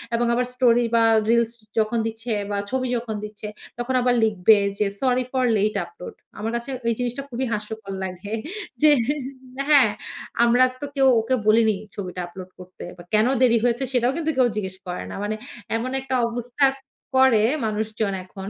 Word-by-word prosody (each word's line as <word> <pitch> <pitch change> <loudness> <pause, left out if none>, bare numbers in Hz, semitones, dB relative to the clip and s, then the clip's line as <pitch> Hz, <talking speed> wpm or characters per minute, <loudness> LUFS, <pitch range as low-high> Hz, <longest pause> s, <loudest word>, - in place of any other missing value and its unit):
এবং 240 +1 +1
আবার 250 +1 +1
স্টোরি 240 -2 +4
বা 230 - +5 0.3
রিলস 235 0 +3 0.3
যখন 220 +2 +1
দিচ্ছে 225 +2 -5 0.2
বা 205 - -1
ছবি 260 0 -1
যখন 230 -2 -4
দিচ্ছে 210 0 -7 0.3
তখন 240 +2 -2
আবার 245 0 +3
লিখবে 215 0 +4 0.2
যে, 210 - +3 0.2
সরি 255 -1 +2
ফর 260 -1 +1
লেট 210 +1 +1
আপলোড। 435 +2 -10 0.3
আমার 220 +2 -2
কাছে 235 +3 -4 0.2
এই - - +2
জিনিসটা 245 +2 -2
খুবই 255 +1 -2
হাস্যকর 210 -1 -5
লাগে। 190 +3 -6 0.5
যে 305 - +7 0.8
হ্যাঁ, 275 -8 +6 0.5
আমরা 240 +2 +5 0.2
তো - - -2
কেউ 270 -1 +4
ওকে 240 +4 +1
বলিনি 220 0 +4 0.2
ছবিটা 185 -2 -5
আপলোড 185 +1 -10
করতে। 185 0 -11
বা 175 - -11
কেন 215 +2 +4
দেরি 240 -2 +5
হয়েছে 245 +2 +1
সেটাও 245 0 +3
কিন্তু 320 -1 0
কেউ 255 -2 +5
জিজ্ঞেস 190 -3 -3
করে 180 0 -4
না। - - -6
মানে 210 +1 -1 0.4
এমন 240 +3 -2
একটা 265 -1 -2
অবস্থা 245 +3 0 0.5
করে 260 -5 +5 0.2
মানুষজন 215 -1 -2
এখন। 190 +1 -8
230 Hz, 170 wpm, -23 LUFS, 210-250 Hz, 0.8 s, যে